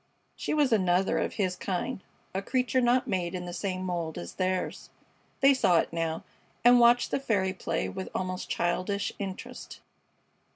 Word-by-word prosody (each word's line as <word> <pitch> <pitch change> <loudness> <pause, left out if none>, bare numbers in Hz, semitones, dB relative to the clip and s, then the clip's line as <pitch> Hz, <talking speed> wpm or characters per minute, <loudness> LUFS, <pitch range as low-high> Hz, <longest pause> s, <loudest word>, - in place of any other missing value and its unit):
She - - -2
was 285 -5 +3
another 185 -2 +2
of - - -1
his 185 -4 0
kind, 195 +5 -3 0.3
a 190 - -1
creature 255 +4 +1
not 245 +1 +3
made 180 -1 -1
in 180 -1 -4
the 175 - -6
same 185 0 -3
mold 170 -3 -3
as 85 - -6
theirs. 185 0 -2 0.5
They 275 +1 +7
saw 185 -10 +3
it 165 - 0
now, 165 -1 -2 0.4
and 245 0 +8
watched 240 +1 +5
the - - +1
fairy 200 -8 0
play 185 - -2
with 190 -1 -5
almost 185 -1 -3
childish 185 +4 -1
interest. 195 -2 -7
190 Hz, 165 wpm, -28 LUFS, 180-240 Hz, 0.5 s, and